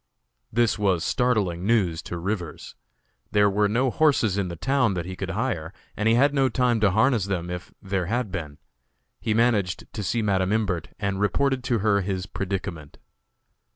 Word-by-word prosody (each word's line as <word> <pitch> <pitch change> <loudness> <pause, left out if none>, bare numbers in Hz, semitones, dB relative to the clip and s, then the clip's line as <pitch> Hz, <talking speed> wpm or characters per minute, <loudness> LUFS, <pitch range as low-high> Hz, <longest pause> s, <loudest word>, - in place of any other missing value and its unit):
This 115 -1 +2
was 95 -5 +2
startling 105 -9 +1
news 95 -7 +1
to 85 - -4
Rivers. 90 -1 -4 0.6
There 105 -1 +4
were 105 +1 +2
no 125 +4 +1
horses 135 -9 +3
in 100 -2 -1
the 85 - -5
town 125 - +1
that 85 -2 -3
he 95 +1 -6
could 95 0 -5
hire, 95 -6 -2 0.2
and 105 +2 +1
he 115 - +4
had 140 +4 +4
no 135 -2 +3
time 120 -1 +1
to 105 -2 +4
harness 110 +1 +2
them 90 -3 -3
if 90 +1 -6
there 95 -3 -1
had 120 0 -1
been. 75 -5 -5 0.6
He 110 - -1
managed 110 -6 +1
to 110 - -4
see 110 +4 -1
Madam 95 -2 +1
Imbert, 95 -8 0
and 100 -1 -2
reported 130 +7 +1
to 120 -3 +1
her 100 -2 +3
his 95 -1 -3
predicament. 95 -7 -5
100 Hz, 180 wpm, -25 LUFS, 90-115 Hz, 0.6 s, There